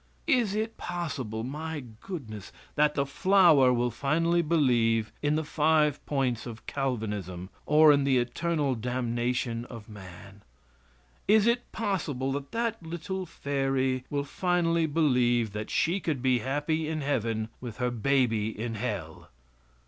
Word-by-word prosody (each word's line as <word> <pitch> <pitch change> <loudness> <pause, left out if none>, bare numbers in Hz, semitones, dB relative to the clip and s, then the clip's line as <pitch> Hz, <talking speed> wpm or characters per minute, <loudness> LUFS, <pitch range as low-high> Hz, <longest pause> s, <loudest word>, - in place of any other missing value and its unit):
Is 245 -10 +2
it 220 +1 -2
possible, 130 -11 -4
my 150 +3 -5 0.2
goodness, 110 - -7 0.2
that 150 0 +2
that 140 - +1
flower 155 -3 +5
will 120 0 +1
finally 165 +7 +1
believe 120 -9 +2
in 150 +1 +1
the 160 - 0
five 150 -1 +2
points 130 -5 -1
of 115 -1 -9
Calvinism 105 -9 -3 0.2
or 155 +1 +7
in 140 -1 +2
the 135 -2 +3
eternal 145 +3 0
damnation 120 0 -2
of 115 -3 -10
man? 100 -1 -12 0.9
Is 215 0 +5
it 235 +1 +1
possible 165 - -2
that 140 0 -4
that 230 -2 -2
little 175 +3 -5
fairy 135 -3 -1
will 145 -1 -1
finally 170 +1 +1
believe 125 -8 +2
that 105 0 -5
she 175 +5 +1
could 150 -9 -2
be 130 -2 +3
happy 145 +6 -1
in 155 -1 -2
Heaven 115 -6 -1
with 120 -4 -7
her 125 -1 0
baby 120 -3 +1
in 115 0 -3
Hell? 100 -8 -5
135 Hz, 140 wpm, -28 LUFS, 120-160 Hz, 0.9 s, or